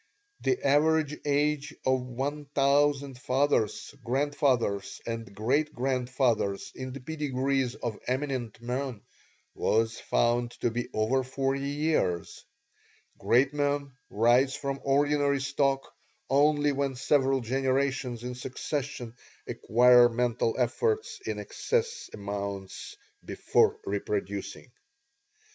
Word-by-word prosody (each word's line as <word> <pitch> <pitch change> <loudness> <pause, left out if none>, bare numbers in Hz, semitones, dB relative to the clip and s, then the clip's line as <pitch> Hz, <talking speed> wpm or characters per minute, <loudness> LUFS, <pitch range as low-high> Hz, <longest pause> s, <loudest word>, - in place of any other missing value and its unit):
The 385 - -1
average 150 +1 +3
age 145 0 0
of 130 0 +2
one 135 +4 -4
thousand 140 -1 +2
fathers, 130 -4 0
grandfathers, 130 -6 0
and 115 -3 -5
great 140 +9 0
grandfathers 125 -5 0
in 130 0 -6
the 140 - -7
pedigrees 135 -3 -1
of 115 -3 -5
eminent 130 -4 -2
men 125 -2 -3 0.5
was 115 +1 +1
found 120 0 +1
to 120 - +1
be 120 +1 -3
over 110 +5 +1
forty 135 +1 -2
years. 145 - -1 0.8
Great 135 +4 +3
men 145 -1 -1 0.2
rise 120 +5 +3
from 140 0 -3
ordinary 140 0 +2
stock 135 0 0 0.4
only 145 +1 +4
when 140 -1 -1
several 135 0 +2
generations 130 0 -1
in 125 0 -4
succession 130 -1 -4 0.3
acquire 120 +2 +5
mental 120 -1 0
efforts 435 - 0
in - - -2
excess 470 0 -2
amounts 100 -1 -6 0.3
before - - +2
reproducing." 100 +3 -4
130 Hz, 105 wpm, -28 LUFS, 120-145 Hz, 0.8 s, acquire